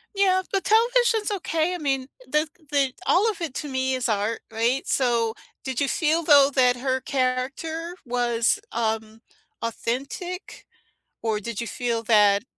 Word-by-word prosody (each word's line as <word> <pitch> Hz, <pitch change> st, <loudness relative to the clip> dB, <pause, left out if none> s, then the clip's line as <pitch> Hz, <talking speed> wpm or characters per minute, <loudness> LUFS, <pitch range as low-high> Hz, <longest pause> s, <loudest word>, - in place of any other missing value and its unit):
Yeah, 375 Hz, -1 st, +3 dB
but 390 Hz, -1 st, 0 dB
television's 460 Hz, -1 st, +3 dB
okay, 330 Hz, 0 st, -1 dB
I -, -, -3 dB
mean, 270 Hz, -4 st, -1 dB, 0.2 s
the 300 Hz, +3 st, +1 dB, 0.2 s
the 275 Hz, -3 st, +2 dB
all 420 Hz, +5 st, +4 dB
of 400 Hz, -, -4 dB
it, 315 Hz, -6 st, -3 dB
to 295 Hz, -, -4 dB
me, 260 Hz, 0 st, 0 dB
is 255 Hz, -2 st, -1 dB
art, 215 Hz, +1 st, 0 dB
right? 235 Hz, +4 st, 0 dB
So, 235 Hz, -4 st, +1 dB, 0.3 s
did 260 Hz, -2 st, -3 dB
you 280 Hz, -, +1 dB
feel, 325 Hz, +2 st, +1 dB
though, 285 Hz, -3 st, +7 dB
that 250 Hz, -1 st, +4 dB
her 260 Hz, +1 st, 0 dB
character 275 Hz, +7 st, -2 dB
was, 240 Hz, -1 st, +1 dB
um, 220 Hz, -1 st, -2 dB, 0.4 s
authentic? 275 Hz, -, -4 dB, 0.6 s
Or 220 Hz, -2 st, 0 dB
did 230 Hz, 0 st, -5 dB
you 235 Hz, -, -3 dB
feel 235 Hz, -1 st, -2 dB
that 210 Hz, -2 st, +4 dB
260 Hz, 155 wpm, -24 LUFS, 235-325 Hz, 0.6 s, though